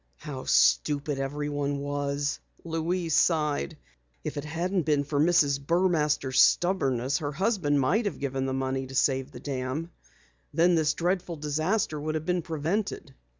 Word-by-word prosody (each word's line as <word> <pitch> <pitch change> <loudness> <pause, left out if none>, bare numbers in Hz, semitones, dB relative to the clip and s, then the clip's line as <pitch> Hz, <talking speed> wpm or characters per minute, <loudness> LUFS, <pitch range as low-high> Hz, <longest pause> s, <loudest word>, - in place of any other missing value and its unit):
"How 135 -3 -7
stupid 145 -1 +2
everyone 145 +1 -2
was," 145 0 -2 0.2
Louise 165 0 -1
sighed. 155 -1 +1 0.5
"If - - -4
it 145 - -4
hadn't 175 +5 -1
been 150 -2 +1
for 145 0 -2
Mrs. 145 -4 +3
Burmaster's 150 -5 +1
stubbornness, 135 -8 +2
her 145 -3 -3
husband 180 -5 +1
might 195 - +2
have 205 - -2
given 135 -1 -2
the - - -1
money 130 0 -2
to 135 - -9
save 135 0 +1
the 125 - -10
dam. 135 +4 -4 0.6
Then 170 +2 +4
this 155 -2 +2
dreadful 180 0 -1
disaster 155 +2 -1
would 155 +1 -2
have 155 0 -3
been 180 -1 0
prevented." 165 -1 -3
150 Hz, 150 wpm, -27 LUFS, 140-170 Hz, 0.6 s, Then